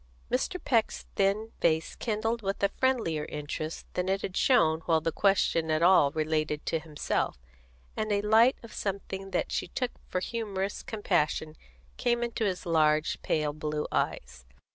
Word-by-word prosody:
Mr. 265 +8 0
Peck's 230 -4 +1
thin 205 +3 +1
face 160 -1 +1
kindled 225 +1 -1
with 195 0 -3
a 200 - +4
friendlier 225 -12 0
interest 150 +2 -5
than 180 +1 -1
it 195 +1 0
had 185 - -4
shown 160 - +4
while 165 -2 +4
the 165 +1 -1
question 175 -4 +2
at 155 +1 +2
all 175 -5 +6
related 155 -1 -1
to 165 - 0
himself, 150 - -2 0.6
and 215 0 -2
a 205 0 +1
light 225 +4 +5
of 230 - -11
something 195 -1 -4
that - - -1
she - - -1
took 250 +7 -2 0.2
for 185 - 0
humorous 200 -2 -3
compassion 160 -7 -1 0.4
came 240 -1 +1
into 235 -1 -2
his 190 -1 -2
large, 155 -2 +2
pale 150 -2 0
blue 150 0 -3
eyes. 60 0 -2
190 Hz, 160 wpm, -29 LUFS, 155-220 Hz, 0.6 s, all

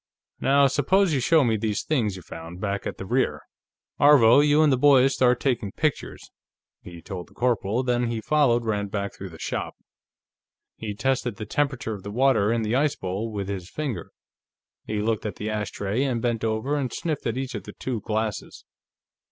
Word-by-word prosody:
"Now, 140 +1 +4
suppose 160 +7 +2
you 140 - +2
show 155 +4 +4
me 115 -3 +1
these 105 -1 -2
things 115 -10 0
you 90 - -10
found, 80 +3 -9
back 100 0 -3
at - - -5
the 95 - -7
rear... 125 +7 0 0.6
Aarvo, 140 -4 +7
you 150 +1 +4
and 150 -3 +4
the - - +4
boys 135 -1 +5
start 125 -1 +3
taking 120 -7 -1
pictures," 155 -4 -3 0.5
he 85 -2 -11
told 90 -1 -7
the - - -23
corporal, 120 0 0
then 120 -1 +1
he 115 -1 -2
followed 120 -1 +2
Rand 105 -2 -1
back 100 -1 -3
through 95 - -8
the 80 - -12
shop. - - -4 1.0
He 105 -2 -6
tested 125 -1 -1
the 110 0 -6
temperature 130 -2 -1
of 100 - -7
the 100 - -7
water 115 -2 +2
in 115 -1 0
the 110 +1 -1
ice 145 +3 +2
bowl 95 +5 -4
with 100 -2 -4
his 95 -3 -5
finger. 130 - -4 0.8
He 105 -1 -2
looked 110 -1 0
at 105 - -5
the 110 +1 -4
ashtray, 105 +1 -2
and 130 -4 0
bent 115 -1 -1
over 110 +6 -1
and 130 -4 -2
sniffed 155 -7 -3
at 115 +1 -2
each 130 -1 -4
of - - -6
the - - -9
two 120 -5 -4
glasses. 110 0 -3
115 Hz, 195 wpm, -25 LUFS, 105-135 Hz, 1.0 s, Aarvo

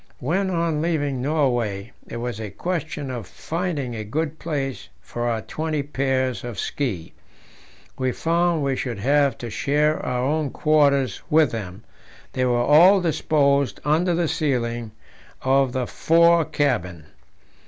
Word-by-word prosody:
When, 190 +9 -1
on 165 -4 0
leaving 145 -6 -1
Norway, 120 -8 0 0.2
it - - -6
was 120 -2 -4
a 105 - -5
question 155 - -4
of 120 -6 -6
finding 160 -7 -3
a 110 -2 -4
good 155 +8 -3
place 140 -5 -4
for 120 0 -4
our 115 -2 -1
twenty 155 -2 -3
pairs 130 -2 -1
of 120 -3 -6
ski, 105 - -3 0.9
we 130 -1 +1
found 170 +1 +1
we 135 -1 0
should 125 -4 -3
have 140 +5 +2
to 120 -2 -7
share 150 +6 +1
our 125 0 -1
own 150 +2 0
quarters 140 -6 +2
with 155 -4 +4
them; 105 -2 -6 0.5
they 130 - 0
were 120 -1 +2
all 170 +9 +7
disposed 140 - +1
under 165 +4 +2
the 170 -1 +1
ceiling 120 -7 -1 0.5
of 135 0 +3
the 130 0 -1
fore 170 +4 +4
cabin. 115 - -1
140 Hz, 145 wpm, -23 LUFS, 120-155 Hz, 0.9 s, all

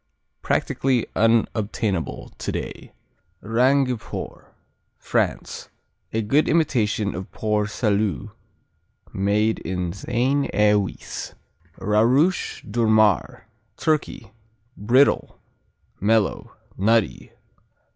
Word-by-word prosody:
Practically 130 -3 0
unobtainable 110 -4 0
today. - - -5 0.5
Rangiport 125 +2 0 0.5
France - - -2 0.4
A 110 0 -1
good 140 +9 +2
imitation 110 -10 +1
of 95 +2 -7
Port 105 -1 -1
Salut 105 -1 -1 0.8
made 105 +3 +1
in 90 -2 -3
Seine 125 +7 0
et 105 0 +4
Oise. 100 -2 -4 0.4
Rarush 125 - +2
Durmar 110 -2 +2 0.3
Turkey 150 -9 -1 0.4
Brittle; 125 +7 +2 0.6
mellow; 110 0 +1 0.2
nutty. 110 +2 +1
110 Hz, 75 wpm, -23 LUFS, 105-125 Hz, 0.8 s, et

